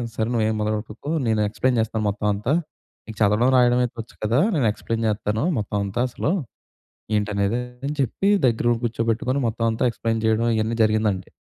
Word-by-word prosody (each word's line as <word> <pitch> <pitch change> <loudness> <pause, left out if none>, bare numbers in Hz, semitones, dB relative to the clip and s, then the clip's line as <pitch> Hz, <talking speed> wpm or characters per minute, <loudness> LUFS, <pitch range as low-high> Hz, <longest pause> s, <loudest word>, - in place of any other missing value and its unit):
"సరే, 110 -1 0
నువ్వు 115 -2 +1
ఏమి 110 - -1
మొదలుపెట్టుకు, 105 +5 -3 0.2
నేను 110 -1 +2
ఎక్స్‌ప్లైన్ 125 +3 0
చేస్తాను 110 -1 -2
మొత్తం 105 +1 -2
అంతా. 105 +7 -1 0.5
నీకు 110 -1 -9
చదవడం, 105 +4 +4
రాయడం 125 0 +4
అయితే 120 - -3
వచ్చ 110 - -15
కదా! 115 +5 +2 0.2
నేను 140 -6 +2
ఎక్స్‌ప్లైన్ 115 +2 -3
చేత్తాను. 105 +2 -1 0.2
మొత్తం 105 0 -3
అంతా 100 +4 -4
అసలు 145 - -2 0.9
ఏంటనేది," 105 +2 0 0.3
అని 145 - -2
చెప్పి 135 - 0 0.2
దగ్గర 115 -1 0
ఉండి 115 -1 -1
కూర్చోబెట్టుకొని, 115 +3 0
మొత్తం 115 +1 -1
అంతా 110 - -2
ఎక్స్‌ప్లైన్ 115 -1 -2
చేయడం 110 +1 +2
ఇవన్నీ 110 +1 -1
జరిగిందండి. 110 -3 0
110 Hz, 175 wpm, -23 LUFS, 105-120 Hz, 0.9 s, చదవడం